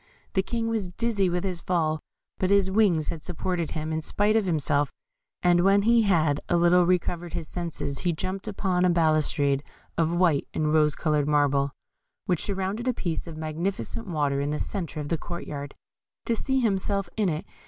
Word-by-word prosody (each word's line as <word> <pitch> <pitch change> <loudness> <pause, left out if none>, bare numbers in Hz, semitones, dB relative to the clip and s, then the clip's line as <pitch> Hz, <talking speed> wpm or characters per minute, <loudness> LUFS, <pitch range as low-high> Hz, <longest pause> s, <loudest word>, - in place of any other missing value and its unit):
The 190 - +3
King 230 +3 -2
was 220 -5 -1
dizzy 200 0 0
with 175 +1 -1
his 180 -3 -2
fall, 160 -3 0 0.4
but 185 - +1
his 200 -1 +3
wings 190 -7 +3
had 165 - -4
supported 175 -1 -3
him, 155 0 -3
in 160 - -1
spite 205 +7 +1
of 220 -2 +3
himself, 145 -4 +1 0.5
and 175 -1 +5
when 200 +1 +4
he 230 +1 +5
had 160 -8 +2
a 175 - +3
little 175 +1 +5
recovered 175 -1 0
his 170 -3 -4
senses 165 -5 -4
he 175 - +1
jumped 185 +5 -4
upon 190 -3 0
a 180 - +4
balustrade 155 -4 +2 0.4
of 165 -1 +3
white 170 -5 +2
and 155 0 +1
rose 150 -1 +4
coloured 150 -3 +1
marble, 145 -2 +2 0.6
which 175 -3 0
surrounded 200 +4 -2
a 250 - +1
piece 170 -1 -3
of 160 -2 -7
magnificent 160 - -3
water 145 -5 0
in 140 - -1
the 150 - -1
centre 170 -5 -4
of 145 -1 -4
the 165 - 0
court 175 +1 -6
yard, 145 -1 -6 0.5
to 230 - +1
see 265 +3 0
himself 200 -3 0
in 210 -4 +1
it. 155 -1 -3
175 Hz, 190 wpm, -26 LUFS, 155-195 Hz, 0.6 s, and